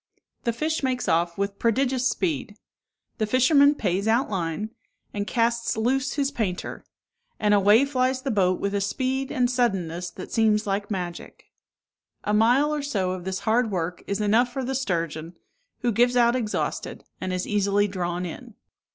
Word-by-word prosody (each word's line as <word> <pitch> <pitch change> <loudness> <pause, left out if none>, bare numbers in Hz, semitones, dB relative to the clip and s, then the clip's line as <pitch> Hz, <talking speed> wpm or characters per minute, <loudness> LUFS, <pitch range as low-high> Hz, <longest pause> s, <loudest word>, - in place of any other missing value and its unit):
The 235 - +2
fish 310 +7 -1
makes 255 -2 -1
off 170 +1 +1
with 200 0 -2
prodigious 255 +2 +1
speed; 270 - -2 0.6
the 215 - +1
fisherman 280 +5 +5
pays 190 -3 -1
out 230 +2 +2
line, 190 +3 -2 0.4
and 205 0 -3
casts 235 -1 0
loose 260 +4 +1
his 280 -2 0
painter; 205 -10 -3 0.6
and 210 -1 +3
away 205 +6 +5
flies 260 -1 0
the 275 - -1
boat 185 -4 +2
with 200 0 -2
a 200 - 0
speed 260 +6 -1
and 250 -4 +2
suddenness 190 -9 -1
that 185 +2 -10
seems 220 -2 +2
like 200 0 -2
magic. 180 -4 -6 0.7
A 210 - -1
mile 245 +8 +4
or 300 - -1
so 200 -10 -1
of 185 -1 -5
this 190 0 -3
hard 225 +1 +2
work 180 -2 -3
is 200 +1 -1
enough 225 +4 +3
for 265 +1 -3
the 265 - -2
sturgeon, 170 - -2 0.5
who 245 -2 +1
gives 245 +3 +3
out 240 0 +4
exhausted, 225 -4 -3 0.2
and 185 - -2
is 185 0 -2
easily 205 0 +2
drawn 180 -2 -3
in. 230 +6 -8
220 Hz, 170 wpm, -25 LUFS, 190-255 Hz, 0.7 s, fisherman